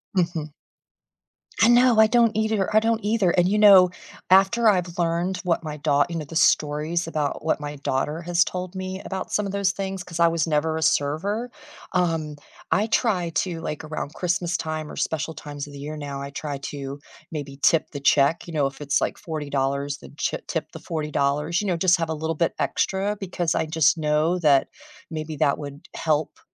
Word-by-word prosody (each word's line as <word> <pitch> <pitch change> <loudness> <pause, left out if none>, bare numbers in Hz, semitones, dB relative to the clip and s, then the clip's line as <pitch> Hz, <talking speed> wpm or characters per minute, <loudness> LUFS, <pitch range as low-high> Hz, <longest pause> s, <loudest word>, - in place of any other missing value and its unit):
Mhm. 170 -4 0 1.1
I 225 - +7
know, 240 -1 +5
I 220 - +7
don't 235 0 +4
either, 220 -2 0
I 215 - +7
don't 225 0 0
either 205 -4 +2
and, 175 +1 +3
you 210 +2 +1
know, 195 -3 +8 0.4
after 195 +5 +5
I've 180 -4 0
learned 175 +2 0
what 175 -2 +1
my 150 -1 -5
daugh 145 -1 +2
you 170 - -5
know, 160 - -3
the 160 +3 -10
stories 155 +2 +2
about 155 -3 -2
what 160 - +1
my 145 0 -5
daughter 145 +3 -2
has 175 +1 +2
told 180 0 -5
me 185 0 -5
about 190 -1 -5
some 210 - +1
of 195 - -3
those 200 -1 +1
things- 195 0 -4
'cause 170 -1 -5
I 170 - +6
was 165 0 0
never 160 +1 0
a - - -3
server- 190 +12 0 0.4
um, 165 -4 0 0.4
I 210 +3 +2
try 190 -7 +1
to 170 0 -1
like, 150 0 -5
around 155 -1 -5
Christmas 175 -1 -1
time 155 -2 -3
or - - -8
special 160 0 -2
times 145 -2 -7
of 145 - -12
the 140 - -9
year 150 +2 -6
now, 140 -2 -5
I 140 - -5
try 145 0 -5
to, 140 0 -6 0.3
maybe 145 -3 -6
tip 165 - +3
the 145 - -5
check, 140 +4 +3
you 170 - -8
know? 150 -3 +1
If 135 - -9
it's, 145 -1 0
like, - - -1
$40 155 -6 -5
dollars 140 +1 -1
then - - -14
chip - - -3
tip - - -3
the - - -9
$40 155 -2 -4
dollars, 150 +5 0
you 205 - -3
know, 180 - +1
just 180 +1 +4
have 165 -1 -2
a 160 - 0
little 160 +1 -3
bit 170 +2 0
extra 200 +2 0
because 180 -4 -1
I - - +1
just 155 0 +3
know 155 +3 +1
that 145 -5 +4 0.4
maybe 155 0 -4
that 140 - +2
would 145 0 -9
help, 155 -1 -1
165 Hz, 210 wpm, -24 LUFS, 150-185 Hz, 1.1 s, know